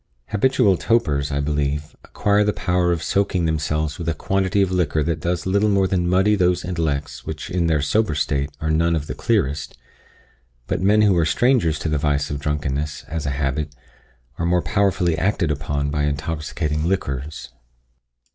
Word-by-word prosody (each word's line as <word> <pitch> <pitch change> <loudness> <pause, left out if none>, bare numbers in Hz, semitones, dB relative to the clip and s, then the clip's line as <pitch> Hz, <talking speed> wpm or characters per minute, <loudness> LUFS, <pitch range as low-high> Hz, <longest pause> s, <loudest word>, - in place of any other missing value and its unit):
Habitual 105 -4 +3
topers, 75 -12 +1
I 70 0 0
believe, 75 0 -2
acquire 105 0 +1
the 105 0 +1
power 90 -3 +1
of 85 -2 -1
soaking 95 -3 +1
themselves 75 -1 -1
with 85 -1 -2
a 80 - -1
quantity 95 +4 +1
of 95 - -1
liquor 80 -4 +1
that 85 +1 -1
does 90 -1 -2
little 100 +3 +2
more 100 -1 +3
than 90 -2 0
muddy 95 +4 +3
those 90 -3 +2
intellects 80 -5 -2
which 80 +3 -6
in 85 -2 +1
their 75 -3 +1
sober 105 +2 +1
state 70 -1 0
are 80 0 -1
none 85 +2 +2
of 75 -2 -2
the - - -5
clearest; 75 - -1 0.9
but - - -2
men 105 +3 +4
who 100 -3 +4
are 85 - +3
strangers 110 - +2
to 80 - -4
the 75 -2 0
vice 70 -1 0
of 70 - -3
drunkenness 75 0 -2
as 80 -2 -3
a 70 -1 -2
habit, 70 +1 -2 0.6
are 85 - 0
more 90 0 +2
powerfully 95 -5 +1
acted 95 -4 +1
upon 70 -1 -2
by 75 -1 0
intoxicating 75 +2 -2
liquors. 75 -6 -3
80 Hz, 175 wpm, -22 LUFS, 75-95 Hz, 0.9 s, men